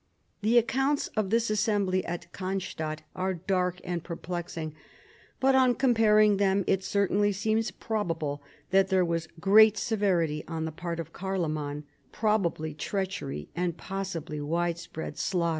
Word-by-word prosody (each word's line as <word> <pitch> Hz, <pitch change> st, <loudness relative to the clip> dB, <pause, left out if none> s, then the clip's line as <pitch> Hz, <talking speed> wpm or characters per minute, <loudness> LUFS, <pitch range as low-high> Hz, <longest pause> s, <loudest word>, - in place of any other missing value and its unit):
The 225 Hz, +3 st, +3 dB
accounts 270 Hz, +5 st, +2 dB
of 215 Hz, -3 st, -1 dB
this 230 Hz, +1 st, +2 dB
assembly 205 Hz, -3 st, +1 dB
at 175 Hz, 0 st, -6 dB
Cannstadt 185 Hz, -5 st, -3 dB
fire 185 Hz, 0 st, -1 dB
dark 180 Hz, 0 st, -1 dB
and 175 Hz, -2 st, -3 dB
perplexing, 170 Hz, -2 st, -5 dB, 0.7 s
but 265 Hz, +1 st, +4 dB
on 260 Hz, -2 st, +5 dB
comparing 215 Hz, -5 st, +4 dB
them 195 Hz, 0 st, +2 dB
it 190 Hz, 0 st, +1 dB
certainly 200 Hz, +1 st, +2 dB
seems 220 Hz, +2 st, 0 dB
probable 165 Hz, -8 st, -3 dB, 0.3 s
that 190 Hz, 0 st, +5 dB
there 190 Hz, -2 st, +3 dB
was 165 Hz, -1 st, -1 dB
great 215 Hz, +4 st, +6 dB
severity 180 Hz, -9 st, +1 dB
on 160 Hz, -1 st, -3 dB
the 160 Hz, -, -3 dB
part 170 Hz, +1 st, -5 dB
of 165 Hz, -, -6 dB
Carloman, 155 Hz, -6 st, -2 dB, 0.3 s
probably 180 Hz, -8 st, 0 dB
treachery 155 Hz, -, -3 dB
and 175 Hz, -1 st, -1 dB
possibly 175 Hz, -6 st, -4 dB
widespread 170 Hz, 0 st, -3 dB
slaughter. 175 Hz, -3 st, +1 dB
185 Hz, 135 wpm, -28 LUFS, 165-210 Hz, 0.7 s, great